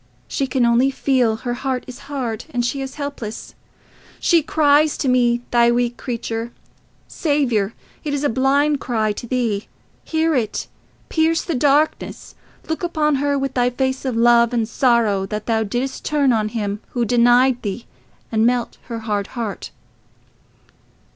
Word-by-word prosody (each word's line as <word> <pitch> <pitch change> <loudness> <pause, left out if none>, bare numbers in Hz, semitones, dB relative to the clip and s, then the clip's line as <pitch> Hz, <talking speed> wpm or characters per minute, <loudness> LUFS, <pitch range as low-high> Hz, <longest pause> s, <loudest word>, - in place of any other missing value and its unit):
She 275 - -1
can 255 -1 +1
only 235 +3 +4
feel 260 -4 +1
her 240 +2 -4
heart 255 0 -2
is 250 -1 -10
hard, 245 -6 -3
and 240 -1 -1
she 275 +3 -2
is 265 -1 -6
helpless. 285 -7 -6 0.7
She 340 -2 +4
cries 300 0 +3
to 275 - -2
me, 240 -1 +3
thy 235 -1 +5
weak 240 0 +1
creature.... 230 -2 -4 0.6
Saviour! 245 - 0 0.3
It 300 - -3
is 285 - -2
a - - +3
blind 280 +4 +2
cry 220 -5 0
to 225 +3 -6
thee. 230 -5 -1 0.4
Hear 320 0 +1
it! 240 -6 -1 0.4
Pierce 325 0 +2
the 340 - -3
darkness! 290 +3 +1 0.3
Look 320 - -2
upon 310 -4 +1
her 285 0 +1
with 270 -1 -2
thy 245 -1 +2
face 260 +1 -2
of 260 -3 -2
love 235 0 +4
and 230 -2 +1
sorrow 230 -6 +2
that 210 +1 -4
thou 225 -1 +1
didst 245 +5 -3
turn 285 -4 +2
on 215 -1 0
him 210 -2 -3
who 240 -2 0
denied 245 +2 +4
thee, 205 +3 -4 0.5
and 220 -1 +2
melt 245 0 0
her 230 -2 -5
hard 205 -2 -2
heart. 225 -4 -4
245 Hz, 160 wpm, -20 LUFS, 230-275 Hz, 0.7 s, thy